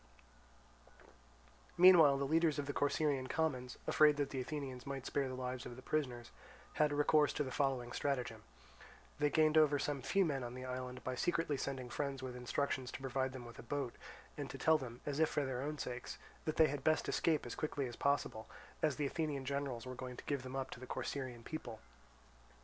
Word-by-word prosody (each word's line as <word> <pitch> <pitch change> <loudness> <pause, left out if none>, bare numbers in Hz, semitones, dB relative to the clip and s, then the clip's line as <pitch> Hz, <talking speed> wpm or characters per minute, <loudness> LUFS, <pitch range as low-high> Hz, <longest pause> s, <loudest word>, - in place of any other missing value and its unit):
Meanwhile 170 -6 +8
the 140 - 0
leaders 160 +1 +3
of 145 - -1
the 145 - -3
Corcyraean 140 -2 +1
commons, 130 -6 -1
afraid 150 -1 +5
that 145 -1 -1
the 130 - -2
Athenians 135 -2 -5
might 135 -2 -4
spare 140 -1 0
the 130 - -4
lives 125 -1 -4
of 120 - -7
the 130 - -11
prisoners, 125 -6 -2 0.5
had 150 -1 +4
recourse 150 0 +4
to 150 - 0
the 130 - -5
following 130 -2 0
stratagem. 125 -6 -2 0.8
They 150 0 +3
gained 155 +1 +5
over 150 -2 +5
some 140 -1 -2
few 195 +9 +2
men 140 -5 -1
on 120 0 -5
the 130 0 -6
island 125 0 -5
by 130 - -2
secretly 160 +3 0
sending 130 -2 -4
friends 140 -2 -2
with 125 -1 -5
instructions 130 +1 -1
to - - -5
provide 130 0 -1
them 130 -2 -8
with 120 - -11
a - - -5
boat, 135 0 -3 0.4
and - - -4
to - - -6
tell 160 -1 +4
them, 120 -3 -8
as 145 0 -2
if 160 - +4
for 145 - 0
their 130 -1 -2
own 150 +2 -3
sakes, 125 -2 -5 0.3
that 155 - -1
they 160 - +7
had 140 -1 -4
best 155 0 +2
escape 160 -5 +1
as 120 - -5
quickly 145 -2 -2
as 120 -2 -6
possible, 120 -6 0 0.3
as 155 -3 +2
the 150 - -1
Athenian 145 -2 -2
generals 140 -4 -2
were 130 - -5
going 125 -1 -7
to - - -8
give 140 -2 -1
them 130 0 -7
up 135 -1 -3
to - - -7
the 130 - -9
Corcyraean 130 -3 -4
people. 120 -8 -6
135 Hz, 205 wpm, -37 LUFS, 125-150 Hz, 0.8 s, Meanwhile